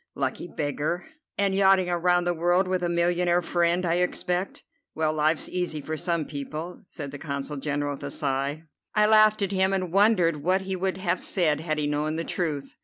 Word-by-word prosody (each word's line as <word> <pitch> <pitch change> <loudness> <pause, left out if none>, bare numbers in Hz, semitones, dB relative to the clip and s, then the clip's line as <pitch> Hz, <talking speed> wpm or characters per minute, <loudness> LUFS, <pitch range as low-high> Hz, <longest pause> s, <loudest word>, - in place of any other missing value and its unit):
Lucky 135 +5 -2
beggar! 150 +2 -2 0.3
And 200 -1 +2
yachting 190 -1 +4
around 175 0 +2
the 175 0 +1
world 175 +3 +2
with 185 -1 0
a 175 - 0
millionaire 175 +1 +2
friend, 175 +1 +1
I 170 0 +1
expect. 180 +1 -1 0.3
Well, 155 -1 +1
life's 155 +1 +1
easy 180 -4 -2
for 155 +2 -4
some 170 -1 -1
people," 155 +5 -6
said 145 -6 -7
the 145 - -8
Consul 140 0 -4
General 145 0 -2
with 140 - -8
a - - -3
sigh. 140 +2 -2 0.3
I 210 0 +5
laughed 215 -1 +5
at 195 - -1
him, 190 0 +2
and 185 -3 -2
wondered 195 -6 +4
what 185 +5 +2
he 190 0 -3
would 190 0 -1
have 180 -1 -1
said 155 -6 +1
had 155 -1 -2
he 150 - 0
known 150 +1 -1
the 165 - -1
truth. 155 -6 -3
175 Hz, 195 wpm, -26 LUFS, 150-185 Hz, 0.3 s, I